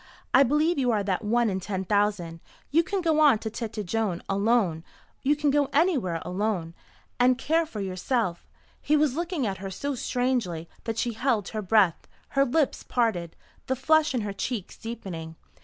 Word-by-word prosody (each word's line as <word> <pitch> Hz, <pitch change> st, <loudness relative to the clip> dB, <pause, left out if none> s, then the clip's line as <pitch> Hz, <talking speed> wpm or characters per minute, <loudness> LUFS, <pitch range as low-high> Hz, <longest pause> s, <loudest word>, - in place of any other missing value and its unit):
I 265 Hz, -, +7 dB
believe 300 Hz, +4 st, +3 dB
you 255 Hz, -2 st, +2 dB
are 215 Hz, -3 st, +1 dB
that 195 Hz, +2 st, -1 dB
one 235 Hz, +2 st, +2 dB
in 190 Hz, -2 st, -1 dB
ten 190 Hz, 0 st, -4 dB
thousand. 200 Hz, -5 st, 0 dB, 0.3 s
You 320 Hz, +4 st, +5 dB
can 380 Hz, +3 st, -2 dB
go 320 Hz, -3 st, +2 dB
on 295 Hz, -7 st, +6 dB
to 220 Hz, 0 st, -5 dB
Tête 220 Hz, -2 st, -5 dB
Jaune 195 Hz, -2 st, -1 dB
alone. 200 Hz, -5 st, +1 dB, 0.4 s
You 290 Hz, +2 st, +3 dB
can 295 Hz, -1 st, +1 dB
go 285 Hz, -1 st, +2 dB
anywhere 275 Hz, -, +1 dB
alone 180 Hz, -2 st, -2 dB, 0.5 s
and 250 Hz, 0 st, +4 dB
care 320 Hz, +4 st, +1 dB
for 215 Hz, -9 st, -6 dB
yourself." 185 Hz, 0 st, -2 dB, 0.3 s
He 305 Hz, +1 st, +2 dB
was 295 Hz, -3 st, +2 dB
looking 340 Hz, -4 st, -2 dB
at 195 Hz, -3 st, -3 dB
her 195 Hz, 0 st, -5 dB
so 280 Hz, +9 st, -3 dB
strangely 245 Hz, -10 st, -1 dB, 0.2 s
that 225 Hz, -1 st, -3 dB
she 240 Hz, 0 st, 0 dB
held 225 Hz, -4 st, 0 dB
her 215 Hz, -, -3 dB
breath, 195 Hz, -3 st, +2 dB, 0.2 s
her 275 Hz, 0 st, +3 dB
lips 285 Hz, +2 st, +1 dB
parted, 195 Hz, -9 st, -1 dB, 0.3 s
the 260 Hz, -, +1 dB
flush 305 Hz, +2 st, +3 dB
in 245 Hz, -, 0 dB
her 205 Hz, -1 st, -3 dB
cheeks 210 Hz, -1 st, -4 dB
deepening. 180 Hz, -8 st, -7 dB
225 Hz, 180 wpm, -26 LUFS, 195-275 Hz, 0.5 s, I